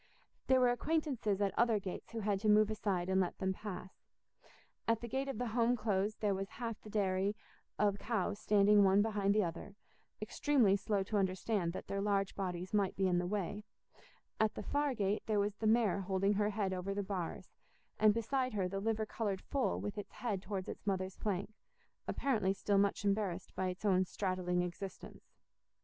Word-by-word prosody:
There 260 -1 +5
were 250 -1 +5
acquaintances 250 -7 0
at 200 -1 +1
other 230 -2 +4
gates 190 -2 -6
who 230 -1 -4
had 200 -1 0
to 215 +1 +1
move 215 0 +5
aside 200 -5 -1
and 190 0 +3
let 180 - -2
them 190 -1 0
pass: 190 -2 -8 0.9
at 230 -1 +3
the 235 - -6
gate 265 +4 -2
of 270 -5 -3
the 245 0 -2
Home 235 +2 +2
Close 210 -1 0
there 210 -2 0
was 195 0 -3
half 230 -2 -5
the 215 - -11
dairy 195 -1 +1 0.4
of 205 -1 +2
cows 205 -3 -1
standing 205 -1 +5
one 195 +1 +5
behind 205 -2 +1
the 215 - +4
other, 170 +4 -5 0.4
extremely 255 -10 +3
slow 200 0 0
to 210 +2 -1
understand 190 -1 0
that - - -6
their 195 0 -2
large 200 -1 +1
bodies 185 -1 -4
might 200 -2 +2
be 190 -1 +2
in 175 -1 +2
the 175 - -1
way; 205 +1 -2 0.8
at 220 0 +2
the - - -5
far 290 -2 0
gate 205 -1 0
there 215 -2 +2
was 205 0 0
the 220 - -1
mare 220 -3 +3
holding 195 +1 +1
her 205 +1 +1
head 200 -2 -1
over 185 +2 -3
the 205 - -1
bars, 190 -4 -4 0.5
and 215 0 +6
beside 255 +3 -1
her 190 -3 +1
the 195 +2 -3
liver 220 +1 0
coloured 205 -3 -2
foal 275 -3 +1
with 205 0 -4
its 205 - -8
head 210 -6 -2
towards 195 -2 -4
its - - -8
mother's 185 -1 -1
flank, 200 +1 -2 0.5
apparently 215 -9 +1
still 200 0 +1
much 200 0 +1
embarrassed 195 -3 -1
by 185 - 0
its 185 +3 -5
own 185 -2 +4
straddling 185 -2 -1
existence. 180 +2 -8
205 Hz, 195 wpm, -35 LUFS, 190-220 Hz, 0.9 s, and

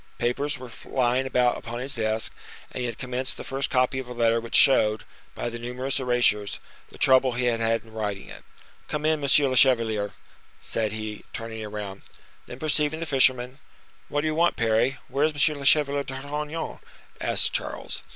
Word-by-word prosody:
Papers 140 +5 -1
were 125 -2 -10
lying 130 +1 +1
about 125 -1 +2
upon 115 +1 -6
his 130 +3 -2
desk, 110 -1 -1 0.4
and - - -6
he 125 - -1
had 115 -2 -5
commenced 130 +1 -2
the - - -7
first 135 0 -2
copy 130 +1 +1
of 130 - -6
a 125 - -7
letter 115 -1 +2
which 115 - -4
showed, 110 -5 +5 0.3
by - - -3
the 120 0 -5
numerous 125 +3 -2
erasures, 120 -5 +2 0.3
the - - -14
trouble 130 -1 +4
he 125 +1 -2
had 120 -2 +1
had 115 0 +1
in 110 -1 -17
writing 105 -3 -4
it. - - -11 0.4
"Come 150 0 -3
in, 155 0 +2
monsieur 140 0 +5
le 130 - -1
chevalier," 115 -6 +3 0.5
said 110 -2 -2
he, 110 -1 -5
turning 115 -1 -6
around. 105 -2 -6 0.5
Then 125 - -8
perceiving 150 +1 +1
the 165 - -3
fisherman, 130 -2 +2 0.5
"What 145 - 0
do 155 - -1
you 155 - -2
mean, 170 +2 +4
Parry? 115 +4 +1
Where 140 - 0
is 155 - 0 0.2
M. 150 - -5
le 140 - -6
Chevalier 145 -1 +4
d'Artagnan?" 145 +4 -5 0.4
asked - - +2
Charles. - - -4
125 Hz, 190 wpm, -25 LUFS, 115-140 Hz, 0.5 s, showed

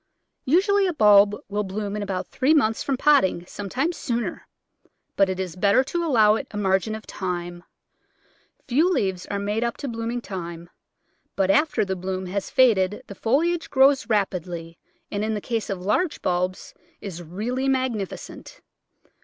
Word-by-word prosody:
Usually 390 +7 +3
a 360 - -1
bulb 205 -5 +6
will 205 +1 -2
bloom 200 +1 -4
in 210 - -3
about 195 -2 -3
three 275 +5 +2
months 225 -7 +2
from 275 -2 -1
potting, 190 -12 +3
sometimes 250 - -3
sooner, 235 -2 -3 0.7
but 195 -1 +3
it 185 0 -3
is 185 -3 -4
better 200 +7 +3
to 340 +6 -2
allow 225 -9 +4
it 220 - -3
a 210 - -7
margin 195 +2 +1
of 220 - -9
time. 175 -2 -5 1.0
Few 295 +8 +3
leaves 190 - -1
are 200 - -3
made 205 +3 -1
up 235 0 -2
to 285 - -5
blooming 230 0 -3
time, 170 -5 -7 0.6
but 195 -1 +2
after 295 +1 +2
the 190 -1 -2
bloom 185 +1 -4
has 190 +2 -3
faded 210 -7 +3
the - - -9
foliage 320 - 0
grows 270 0 +4
rapidly 175 -5 -2 0.3
and, 205 +1 -2
in 220 0 -1
the - - -2
case 225 +1 -3
of 195 -2 -3
large 300 - 0
bulbs, 180 +1 -2 0.3
is 180 -4 -7
really 220 +11 -3
magnificent. 260 - -3
210 Hz, 160 wpm, -24 LUFS, 190-255 Hz, 1.0 s, bulb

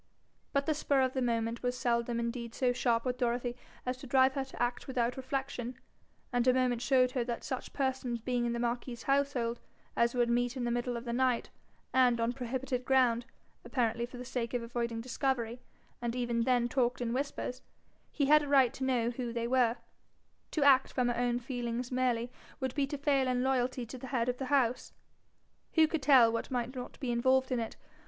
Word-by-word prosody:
But 280 -1 +1
the 310 - +2
spur 285 -2 +1
of 260 0 +1
the 260 - -1
moment 230 -1 -1
was 245 0 -1
seldom 235 -1 0
indeed 235 0 -4
so 250 -2 +2
sharp 235 -1 +1
with 250 0 -2
Dorothy 245 0 0 0.3
as 250 0 -2
to 270 - -10
drive 260 +1 +4
her 275 -1 -1
to 265 - -12
act 240 0 -1
without 245 -2 0
reflection, 260 -2 -4 0.6
and 245 0 +2
a 255 - +5
moment 250 -2 +1
showed 255 -1 +3
her 255 -2 0
that 235 -1 -4
such 260 - -4
persons 260 -3 -1
being 240 +1 -1
in 235 - -1
the - - -2
marquis's 240 0 -3
household 275 -4 +1 0.4
as 235 +1 +2
would 240 -1 +3
meet 245 +2 +1
in 250 - -2
the 240 - 0
middle 240 0 -1
of 235 - -7
the 235 - -3
night, 255 -1 +1 0.4
and 250 -2 +4
on 230 +1 +1
prohibited 255 0 -3
ground, 250 -2 +3 0.4
apparently 235 -2 0
for 245 - -10
the 250 - -7
sake 245 -1 -3
of 240 - -1
avoiding 235 -1 -3
discovery, 245 -1 -2 0.4
and 240 0 -2
even 240 -2 0
then 245 -2 +3
talked 245 0 0
in 240 -1 -2
whispers, 260 -1 -3 0.5
he 285 - +1
had 300 +2 +6
a 295 - -4
right 270 -4 +4
to 265 - -5
know 245 -3 +1
who 245 -1 -4
they 235 0 -2
were: 245 -2 +3 0.7
to 305 - 0
act 270 -2 +5
from 250 -2 +1
her 240 - 0
own 240 0 +1
feelings 245 0 -4
merely 250 -2 0 0.3
would 260 -2 -2
be 280 -1 0
to 290 - -4
fail 275 -2 +2
in 250 0 +1
loyalty 255 -1 0
to 250 +3 -9
the 260 - -7
head 240 -2 0
of 250 0 -1
the 265 - -2
house. 255 -3 +1 0.8
Who 320 -2 +5
could 320 -1 -2
tell 260 -5 +6
what 230 - -2
might 250 -1 -2
not 250 -1 -7
be 260 -4 -2
involved 260 +2 +2
in 250 - +1
it? 225 -1 -4
250 Hz, 210 wpm, -32 LUFS, 235-260 Hz, 0.8 s, had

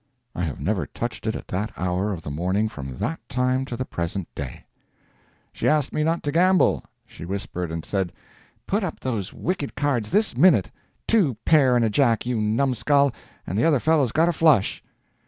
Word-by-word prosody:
I - - -4
have 75 - -5
never - - -1
touched 115 -1 -5
it 110 - 0
at - - -7
that 105 +4 -2
hour 90 +3 -1
of 85 -5 -5
the 75 - -5
morning 95 +8 0
from 65 -8 -7
that 160 - -2
time 130 +1 0
to 120 -3 -6
the 130 - -3
present 85 -1 -4
day. 70 -4 -7 0.9
She - - -2
asked 150 -3 +2
me 155 - 0
not 165 +2 0
to 145 - -1
gamble. 180 +4 +3 0.2
She - - -12
whispered 90 -2 -4
and 80 -1 -5
said, 95 -4 -1 0.5
"Put 205 +2 0
up 180 - -4
those 110 -7 -3
wicked 170 -6 -3
cards 135 -7 0
this 210 - +2
minute!—two 150 - +2
pair 135 -6 +5
and 120 -1 +3
a - - +2
jack, 115 -2 +2
you 120 -3 -1
numskull, 135 +5 +2 0.3
and 95 +4 -2
the - - +2
other 155 -5 +4
fellow's 150 -4 +2
got 160 +5 +3
a 175 - +2
flush!" 150 -10 +3
120 Hz, 190 wpm, -24 LUFS, 95-150 Hz, 0.9 s, pair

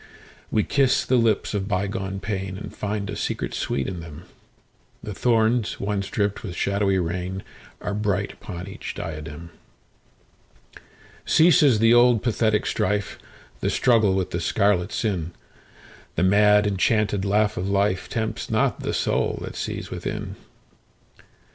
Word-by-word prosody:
We 105 - +2
kiss 135 -2 +2
the 130 - +3
lips 115 -3 +1
of 100 -2 -2
bygone 95 -1 -2
painAnd 95 -1 -5
find 105 -1 -3
a 105 - -4
secret - - -3
sweet 70 - -1
in 90 -3 -4
them:The 85 +5 -13
thorns 115 +1 +1
once 100 -1 -2
dripped 100 -1 -1
with 90 -5 -6
shadowy 100 +1 +1
rainAre 95 +3 -4
bright 100 -1 0
upon 90 -1 -8
each 95 - -7
diadem. 80 +1 -7 1.7
Ceases 150 -7 +5
the 115 +2 +5
old 120 -2 +5
pathetic 110 -2 +1
strife, 105 -1 -1 0.4
The - - 0
struggle 110 -6 +3
with 95 -1 -1
the 85 - -2
scarlet 100 -1 +1
sin:The 90 -3 -5
mad 105 +2 +5
enchanted 105 0 +1
laugh 105 +1 +2
of 90 - -3
lifeTempts 100 +3 -1
not - - +1
the - - -2
soul - - 0
that - - -7
sees - - -5
within. - - -4
100 Hz, 125 wpm, -24 LUFS, 95-110 Hz, 1.7 s, Ceases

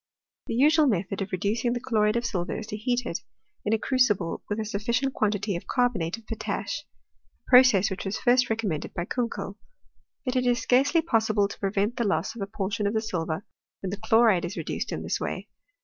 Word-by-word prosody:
The - - -2
usual 300 +4 +5
method 195 -3 -1
of 195 - -4
reducing 215 +6 0
the 245 - -2
chloride 215 -4 +1
of 235 0 0
silver 180 -6 -2
is 220 - -5
to 210 - -5
heat 245 +3 -1
it 170 - -3 0.4
in 210 - -1
a 225 - +4
crucible 215 -9 +1
with 205 +1 -1
a 220 - -2
sufficient 235 +6 -1
quantity 205 -2 0
of 170 - -6
carbonate 225 -8 0
of 230 - -16
potash, 225 - -3 0.6
a - - -21
process 250 -7 +7
which 190 - -4
was 195 +3 -2
first 250 +1 +3
recommended 215 -9 -2
by 175 - -2
Kunkel. 215 -3 -3 0.7
But 255 0 -1
it 250 -1 +2
is 245 0 +3
scarcely 275 +7 +3
possible 220 -8 +2
to - - -10
prevent 200 +4 0
the 235 - +1
loss 220 +3 0
of 230 - -7
a 195 - -2
portion 200 0 -2
of 205 - -1
the - - +3
silver 170 -3 -3 0.4
when 190 - -2
the 200 - -3
chloride 220 -3 +4
is 185 - -4
reduced - - -3
in - - -3
this - - -1
way. - - -4
215 Hz, 210 wpm, -26 LUFS, 195-245 Hz, 0.7 s, process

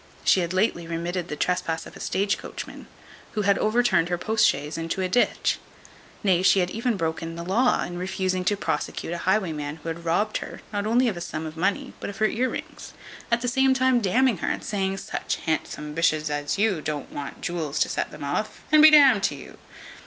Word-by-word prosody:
She - - +4
had 170 -1 -1
lately 185 -3 0
remitted 170 +1 -3
the 150 - -4
trespass 180 0 -1
of - - -12
a - - -11
stage 200 +2 0
coachman, - - -8 0.5
who 210 - -1
had 200 0 +3
overturned 215 -6 +2
her 175 - 0
post 220 +3 +3
chaise 145 +2 -3
into 165 +3 -3
a - - +1
ditch; 240 +7 +1 0.6
nay, 185 -3 +3
she 190 - +5
had 180 0 0
even 230 0 -1
broken 165 0 -3
the 170 - -5
law, 230 +8 +2
in 175 0 -5
refusing 185 0 -1
to 205 +2 +2
prosecute 165 -1 -3
a 175 - -4
highwayman 160 -7 0
who 165 +1 -7
had 165 +1 -5
robbed 200 +6 +1
her, - - -8
not 205 0 -1
only 245 +3 +3
of 205 -6 -1
a - - -5
sum 160 -2 -4
of 155 0 -7
money, 200 - -1
but - - -5
of 200 - -8
her 220 - +2
ear 245 +4 +1
rings; - - -7 0.4
at 235 0 +2
the 245 - -2
same 265 +2 +3
time 260 -1 +3
d 200 +4 +1
ning 255 -8 +3
her, - - -3
and - - -2
saying, 195 -2 -1
"Such - - -3
handsome 150 -2 -2
b 165 - -4
s 165 - +4 0.2
as 145 +3 -2
you 200 -6 +1
don't 150 -2 -4
want 140 -1 -6
jewels 160 -4 -3
to - - +4
set - - -2
them 150 -1 -10
off, 145 +10 -3
and 305 0 +7
be 310 - +10
d 305 - +8
n'd 265 -8 +6
to - - 0
you." - - -12
185 Hz, 225 wpm, -25 LUFS, 165-220 Hz, 0.6 s, be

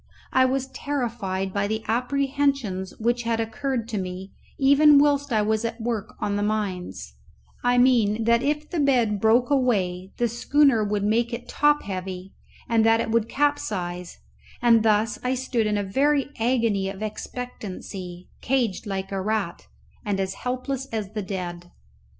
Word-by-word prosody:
I 260 0 +5
was 265 0 0
terrified 230 -10 -3
by 200 0 0
the 220 +1 -2
apprehensions 255 -5 0
which 240 +2 0
had 230 -1 -1
occurred 235 +1 -2
to 215 -3 -2
me 185 +1 -6 0.3
even 285 +2 +6
whilst 285 -1 +3
I 215 -2 +2
was 220 +1 0
at 230 0 -3
work 225 -2 -3
on 205 -1 -1
the - - -1
mines; 190 - -3 0.5
I 245 0 +3
mean, 230 -4 +3
that 235 +1 +3
if 300 +2 -1
the 345 - -3
bed 240 -8 +2
broke 235 +4 +3
away 190 -9 +1
the 240 - +2
schooner 240 +1 +3
would 205 -1 -1
make 230 +3 +1
it 245 +1 -5
top 295 0 +2
heavy 185 -1 -6 0.3
and 230 -1 +3
that 225 0 +4
it 225 - -1
would 230 0 +1
capsize; 185 -12 -1 0.4
and 235 -2 +5
thus 215 0 +2
I 250 +1 +1
stood 245 -3 -1
in 210 -1 0
a 205 - 0
very 280 +7 +1
agony 225 -5 +1
of 195 +2 -6
expectancy, 195 -5 -7
caged 235 -6 0
like 195 -1 -4
a 195 -1 -2
rat, 195 - -2 0.4
and 200 -2 -1
as 190 0 -1
helpless 255 +3 -3
as 215 -5 -4
the 215 - -2
dead. 175 -3 -5
225 Hz, 160 wpm, -24 LUFS, 195-255 Hz, 0.5 s, even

